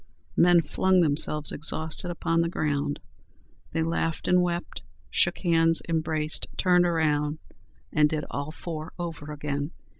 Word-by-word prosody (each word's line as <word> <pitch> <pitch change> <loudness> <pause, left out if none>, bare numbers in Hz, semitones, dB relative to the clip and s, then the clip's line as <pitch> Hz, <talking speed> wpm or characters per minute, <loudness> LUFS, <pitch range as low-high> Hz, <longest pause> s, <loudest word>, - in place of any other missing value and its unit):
Men 175 -1 +5
flung 185 +4 +2
themselves 150 -1 +1
exhausted 160 +3 -1
upon 165 -1 0
the 170 - 0
ground. 145 -3 -1 0.7
They 160 0 0
laughed 165 0 -2
and 180 0 +4
wept, 175 0 -3 0.3
shook - - +2
hands, 165 -2 +3
embraced; 155 -1 0
turned 180 -1 +4
round, 150 -2 +1 0.6
and 150 -1 +4
did 155 -1 -2
all 140 +1 -3
four 160 0 -7
over 165 -4 -6
again. 145 -1 -3
160 Hz, 130 wpm, -26 LUFS, 150-170 Hz, 0.7 s, Men